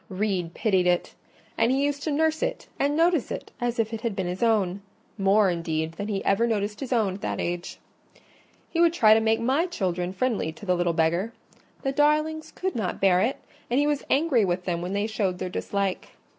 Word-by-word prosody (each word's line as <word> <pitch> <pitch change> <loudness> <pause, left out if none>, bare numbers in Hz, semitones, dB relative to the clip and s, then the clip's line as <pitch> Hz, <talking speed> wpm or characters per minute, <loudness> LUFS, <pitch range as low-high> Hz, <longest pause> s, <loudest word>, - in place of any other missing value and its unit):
Reed 185 -3 -2
pitied 190 -5 +2
it; 175 -1 +1 0.5
and 230 +2 +3
he 275 +2 +2
used 285 0 -1
to 310 - -2
nurse 315 +2 +1
it - - -2
and 285 +2 +1
notice 335 -4 +2
it - - -6
as 240 0 -1
if 225 0 0
it 225 - -4
had 230 -4 -2
been 190 -2 -2
his 180 +1 -4
own: 200 -5 +2 0.3
more, 195 -1 +3
indeed, 160 -2 -2
than 200 +5 -6
he 200 -2 -3
ever 210 +4 +3
noticed 210 -2 -1
his 270 - -6
own 220 -6 +2
at 195 - -9
that - - -3
age. 175 0 -3 0.9
He 335 - -1
would 340 -1 +5
try 215 -10 +6
to 220 - +5
make 220 0 +2
my 270 +9 +1
children 180 - -2
friendly 200 -5 -1
to 160 - -12
the 180 - +2
little 175 -1 +1
beggar: 170 +7 +1 0.5
the 270 - 0
darlings 305 +2 +1
could 375 0 -3
not 210 -6 -2
bear 185 -2 +4
it, 250 +7 0 0.3
and 245 +3 +2
he 290 - +3
was 295 -1 0
angry 275 -5 +3
with 180 -1 -1
them 175 -2 -1
when 180 +2 -4
they 205 +1 0
showed 205 -4 -1
their 185 0 -4
dislike. 195 +1 -2
215 Hz, 215 wpm, -26 LUFS, 185-270 Hz, 0.9 s, try